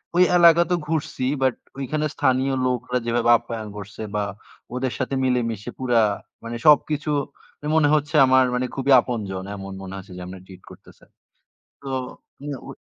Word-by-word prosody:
ঐ -, -, +1 dB, 0.2 s
এলাকা 170 Hz, 0 st, +7 dB
তো -, -, +4 dB
ঘুরছি, 155 Hz, -5 st, -2 dB, 0.2 s
বাট 130 Hz, -2 st, +3 dB, 0.3 s
ঐখানে 150 Hz, +3 st, -2 dB
স্থানীয় 130 Hz, 0 st, +1 dB
লোকরা 125 Hz, 0 st, -1 dB
যেভাবে 120 Hz, 0 st, +1 dB
আপ্যায়ন 110 Hz, -3 st, -7 dB
করছে 105 Hz, +1 st, -9 dB
বা 105 Hz, -, +1 dB, 0.5 s
ওদের 130 Hz, -1 st, -2 dB
সাথে 130 Hz, +1 st, -1 dB
মিলেমিশে 120 Hz, -3 st, -1 dB
পুরা 120 Hz, -3 st, +3 dB, 0.4 s
মানে 115 Hz, +1 st, -5 dB
সবকিছু 150 Hz, 0 st, +4 dB, 0.5 s
মানে 150 Hz, -, -6 dB
মনে 150 Hz, -2 st, +4 dB
হচ্ছে 150 Hz, +1 st, -1 dB
আমার 130 Hz, 0 st, +5 dB
মানে 125 Hz, +1 st, 0 dB
খুবই 135 Hz, +1 st, 0 dB
আপনজন। 100 Hz, -6 st, -4 dB
এমন 95 Hz, 0 st, -8 dB
মনে 95 Hz, 0 st, -8 dB
হচ্ছে 95 Hz, -1 st, -10 dB
যে, -, -, -7 dB
আমরা 95 Hz, 0 st, -9 dB
treat 95 Hz, -1 st, -14 dB
করতেছে। -, -, -17 dB, 0.8 s
তো -, -, -12 dB, 0.5 s
হ্যাঁ, 145 Hz, -2 st, -5 dB
ঐ -, -, -10 dB
125 Hz, 165 wpm, -23 LUFS, 110-140 Hz, 0.8 s, এলাকা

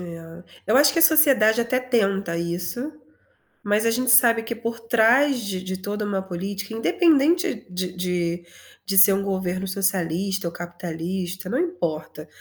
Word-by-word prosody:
É, 165 Hz, 0 st, -10 dB, 0.2 s
eu 220 Hz, -, +3 dB
acho 280 Hz, 0 st, +5 dB
que 330 Hz, -, -1 dB
a -, -, +4 dB
sociedade 260 Hz, -9 st, +5 dB
até 235 Hz, +2 st, 0 dB
tenta 200 Hz, -8 st, -1 dB
isso, 175 Hz, -, -4 dB, 0.7 s
mas 210 Hz, +2 st, 0 dB
a 230 Hz, -, +2 dB
gente 250 Hz, +1 st, +1 dB
sabe 230 Hz, -2 st, +5 dB
que 235 Hz, +1 st, -5 dB
por 230 Hz, 0 st, -5 dB
trás 240 Hz, +4 st, +3 dB
de 190 Hz, -3 st, -5 dB
de 185 Hz, 0 st, -5 dB
toda 205 Hz, +2 st, -5 dB
uma 195 Hz, -2 st, -2 dB
política, 195 Hz, +3 st, -6 dB
independente 335 Hz, -, +1 dB
de 180 Hz, 0 st, -4 dB
de 175 Hz, -1 st, -3 dB, 0.4 s
de 195 Hz, 0 st, -2 dB
ser 195 Hz, +1 st, +8 dB
um 195 Hz, -, 0 dB
governo 190 Hz, -1 st, -3 dB
socialista 190 Hz, -1 st, -1 dB
ou -, -, -4 dB
capitalista, 175 Hz, +2 st, -6 dB
não 255 Hz, -, -1 dB
importa. 160 Hz, -, -4 dB
200 Hz, 160 wpm, -22 LUFS, 180-240 Hz, 0.7 s, ser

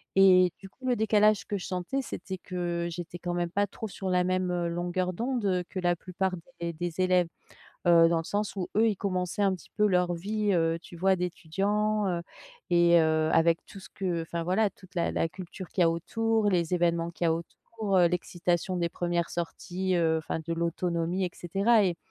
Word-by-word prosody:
Et 185 Hz, -2 st, +6 dB
du 195 Hz, +1 st, -12 dB
coup, 260 Hz, +6 st, -9 dB
le 250 Hz, -, +3 dB
décalage 215 Hz, -1 st, +3 dB
que 205 Hz, -, -2 dB
je 185 Hz, -, -6 dB
sentais 185 Hz, +9 st, -2 dB
c'était 190 Hz, -6 st, -6 dB
que, 175 Hz, -2 st, -3 dB
j'étais 175 Hz, +1 st, -7 dB
quand 175 Hz, +1 st, -3 dB
même 175 Hz, -1 st, -1 dB
pas 200 Hz, +2 st, +1 dB
trop 220 Hz, +3 st, -6 dB
sur 195 Hz, -1 st, -5 dB
la 180 Hz, -1 st, +3 dB
même, 185 Hz, 0 st, 0 dB
heu, 175 Hz, -1 st, -1 dB
longueur 175 Hz, +2 st, -1 dB
d'onde, 240 Hz, +3 st, -2 dB
heu, 185 Hz, -2 st, +1 dB
que 200 Hz, -, -8 dB
la 175 Hz, -1 st, +2 dB
plupart 185 Hz, +2 st, -2 dB, 0.3 s
des 170 Hz, 0 st, -3 dB
des 175 Hz, +1 st, -5 dB
élèves, 185 Hz, -1 st, +3 dB, 0.6 s
heu, 165 Hz, -1 st, +7 dB
dans 170 Hz, -, +2 dB
le 165 Hz, -, -4 dB
sens 205 Hz, +2 st, -2 dB
où 180 Hz, -, -3 dB
eux, 225 Hz, +1 st, +5 dB
ils 210 Hz, -, 0 dB
commençaient 185 Hz, -1 st, -2 dB
un 195 Hz, -1 st, +3 dB
petit 180 Hz, -, -13 dB
peu 210 Hz, -, +5 dB
leur 180 Hz, -2 st, +2 dB
vie 205 Hz, +4 st, -1 dB
heu, 165 Hz, -2 st, +2 dB
tu 175 Hz, -, -12 dB
vois, 190 Hz, +2 st, +3 dB
d'étudiant, 195 Hz, +5 st, 0 dB
heu, 175 Hz, -2 st, -1 dB, 0.5 s
et 170 Hz, 0 st, +5 dB
heu, 160 Hz, 0 st, +2 dB
avec 165 Hz, 0 st, +3 dB
tout 195 Hz, -, -12 dB
ce -, -, -12 dB
que 180 Hz, -3 st, -2 dB
enfin 165 Hz, +1 st, -4 dB
voilà 190 Hz, +5 st, +2 dB
toute 185 Hz, -1 st, -19 dB
la 170 Hz, -2 st, 0 dB
la 165 Hz, -, 0 dB
culture 185 Hz, -1 st, -9 dB
qu'il 185 Hz, -, -3 dB
y -, -, +7 dB
a 165 Hz, -, +4 dB
autour, 220 Hz, +6 st, 0 dB
les 175 Hz, -1 st, +1 dB
événements 170 Hz, -1 st, +1 dB
qu'il 170 Hz, 0 st, -4 dB
y -, -, +4 dB
a -, -, +3 dB
autour, 195 Hz, +5 st, -3 dB
heu, 175 Hz, -2 st, +6 dB
l'excitation 175 Hz, +1 st, -1 dB
des 170 Hz, -1 st, 0 dB
1ères 175 Hz, 0 st, -1 dB
sorties, 180 Hz, +2 st, -3 dB
heu, 160 Hz, -1 st, +2 dB
enfin 160 Hz, +1 st, -4 dB
de 170 Hz, -, -1 dB
l'autonomie 170 Hz, +2 st, -1 dB
et 180 Hz, -, -2 dB
cetera 200 Hz, +5 st, +2 dB
et 175 Hz, -3 st, 0 dB
180 Hz, 215 wpm, -28 LUFS, 170-195 Hz, 0.6 s, heu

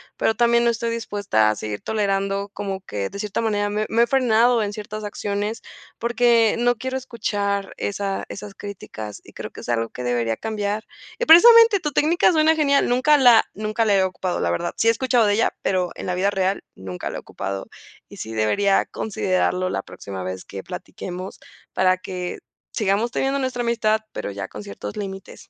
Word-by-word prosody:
pero 225 Hz, -, +1 dB
también 235 Hz, +1 st, +3 dB
no 235 Hz, -, +4 dB
estoy 235 Hz, 0 st, -1 dB
dispuesta 205 Hz, -, +1 dB
a 110 Hz, -, 0 dB
seguir 105 Hz, 0 st, -5 dB
tolerando 200 Hz, -1 st, -1 dB
como 195 Hz, -1 st, -4 dB
que 100 Hz, -, -4 dB
de 200 Hz, -, -8 dB
cierta 210 Hz, +1 st, -2 dB
manera 205 Hz, -2 st, 0 dB
me 210 Hz, +1 st, -1 dB
me 230 Hz, +1 st, +4 dB
he -, -, +1 dB
frenado 240 Hz, -2 st, +3 dB
en 205 Hz, -1 st, -1 dB
ciertas 215 Hz, 0 st, -7 dB
acciones 205 Hz, +1 st, -3 dB, 0.4 s
porque 235 Hz, -1 st, +3 dB
no 245 Hz, 0 st, +3 dB
quiero 260 Hz, +3 st, -4 dB
escuchar 205 Hz, -5 st, -2 dB
esa 200 Hz, -1 st, -3 dB
esas 205 Hz, 0 st, -8 dB
críticas 110 Hz, -, -8 dB
y -, -, -16 dB
creo -, -, -7 dB
que -, -, -10 dB
es -, -, -9 dB
algo 115 Hz, -1 st, 0 dB
que 125 Hz, -, -7 dB
debería 120 Hz, -2 st, 0 dB
cambiar, 215 Hz, -1 st, -3 dB, 0.3 s
y 485 Hz, -, -1 dB
precisamente 460 Hz, +3 st, +8 dB
tu 300 Hz, -4 st, -3 dB
técnica 325 Hz, +6 st, +3 dB
suena 320 Hz, -1 st, +4 dB
genial, 280 Hz, -3 st, +3 dB
nunca 255 Hz, +5 st, +4 dB
la 245 Hz, -5 st, +6 dB
nunca 215 Hz, +2 st, -1 dB
la 205 Hz, -2 st, +3 dB
he 190 Hz, -, +4 dB
ocupado, 185 Hz, -1 st, -2 dB
la 85 Hz, -, 0 dB
verdad, 130 Hz, -, -2 dB
sí -, -, +1 dB
he -, -, +7 dB
escuchado 245 Hz, 0 st, +2 dB
de 205 Hz, -, +3 dB
ella, 225 Hz, -, +1 dB
pero 185 Hz, -2 st, +1 dB
en -, -, -7 dB
la 180 Hz, -, -1 dB
vida 185 Hz, +2 st, +1 dB
real 195 Hz, 0 st, -1 dB
nunca 95 Hz, -1 st, -6 dB
la -, -, -5 dB
he -, -, -4 dB
ocupado 95 Hz, 0 st, -5 dB, 0.4 s
y -, -, -12 dB
sí 110 Hz, -, -6 dB
debería 195 Hz, -, +2 dB
considerarlo 185 Hz, -3 st, -1 dB
la -, -, -1 dB
próxima 95 Hz, -1 st, -8 dB
vez 95 Hz, 0 st, -5 dB
que 100 Hz, -, -7 dB
platiquemos 180 Hz, -, -7 dB, 0.3 s
para 185 Hz, 0 st, +3 dB
que 180 Hz, -1 st, -5 dB, 0.3 s
sigamos 210 Hz, +2 st, +1 dB
teniendo 270 Hz, +2 st, 0 dB
nuestra 260 Hz, -2 st, -2 dB
amistad, 220 Hz, -2 st, +1 dB
pero -, -, -5 dB
ya 100 Hz, -1 st, -5 dB
con 105 Hz, -, -9 dB
ciertos 105 Hz, 0 st, -8 dB
límites. 195 Hz, -2 st, -7 dB
205 Hz, 195 wpm, -22 LUFS, 185-235 Hz, 0.4 s, precisamente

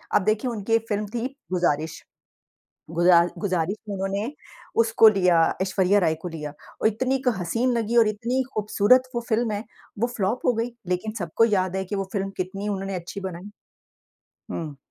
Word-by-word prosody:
अब 210 Hz, -, +4 dB
देखिए 215 Hz, +4 st, +1 dB
उनकी 220 Hz, 0 st, -3 dB
एक 225 Hz, 0 st, +3 dB
फिल्म 210 Hz, 0 st, 0 dB
थी 235 Hz, +1 st, -1 dB, 0.2 s
गुज़ारिश। 160 Hz, -4 st, 0 dB, 0.9 s
गुज़ा 170 Hz, 0 st, +5 dB
गुज़ारिश 185 Hz, -1 st, -1 dB
में -, -, -2 dB
उन्होंने 195 Hz, +5 st, -2 dB, 0.5 s
उसको 225 Hz, 0 st, +6 dB
लिया 180 Hz, -5 st, +3 dB, 0.2 s
ऐश्वर्या 190 Hz, +1 st, +3 dB
राय 160 Hz, -4 st, +2 dB
को -, -, -5 dB
लिया। 150 Hz, -3 st, -6 dB, 0.3 s
और -, -, +5 dB
इतनी 255 Hz, +5 st, 0 dB
क 250 Hz, -, +4 dB
हसीन 230 Hz, +9 st, 0 dB
लगी 230 Hz, +1 st, 0 dB
और 230 Hz, -2 st, +6 dB
इतनी 235 Hz, +5 st, -1 dB
खूबसूरत 215 Hz, +4 st, +3 dB
वो 235 Hz, -, 0 dB
फ़िल्म 225 Hz, 0 st, +1 dB
है, 205 Hz, +1 st, -3 dB, 0.4 s
वो 235 Hz, -, +2 dB
फ्लॉप 205 Hz, +4 st, -1 dB
हो 245 Hz, -, +4 dB
गई। 230 Hz, +2 st, -2 dB, 0.2 s
लेकिन 180 Hz, +4 st, -1 dB
सबको 175 Hz, +5 st, +2 dB
याद 190 Hz, -4 st, +1 dB
है 190 Hz, -, -1 dB
कि 205 Hz, -, -4 dB
वो 195 Hz, -1 st, -1 dB
फ़िल्म 195 Hz, -2 st, -1 dB
कितनी 195 Hz, +3 st, -3 dB
उन्होंने 195 Hz, -1 st, -3 dB
अच्छी 180 Hz, +3 st, -6 dB
बनाई। 190 Hz, +1 st, -6 dB, 1.0 s
हुँ। 150 Hz, -4 st, -5 dB
200 Hz, 175 wpm, -25 LUFS, 180-225 Hz, 1.0 s, उसको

